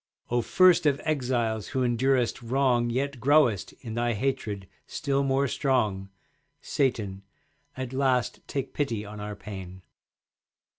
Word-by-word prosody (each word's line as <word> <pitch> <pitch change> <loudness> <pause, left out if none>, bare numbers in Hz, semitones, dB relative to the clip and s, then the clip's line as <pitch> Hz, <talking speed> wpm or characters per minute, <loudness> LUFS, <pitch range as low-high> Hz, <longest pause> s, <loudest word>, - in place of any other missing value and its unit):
O 120 0 +2
first 180 +4 +5
of 140 -1 +2
exiles 120 -7 0
who 130 -1 -1
endurest 125 0 +1
wrong, 120 -1 +2
Yet 135 +2 -2
growest, 130 -7 +3
in 115 -4 -6
thy 120 +1 0
hatred, 105 -5 -2 0.2
still 140 -1 -1
more 135 0 +2
strong, 110 -9 0 0.5
Satan, 110 -9 -1 0.6
at 130 -1 -4
last 130 -2 +1
take 135 -2 -4
pity 115 -8 -2
on 105 +1 -8
our 105 0 -5
pain! 95 -3 -9
125 Hz, 130 wpm, -27 LUFS, 110-135 Hz, 0.6 s, first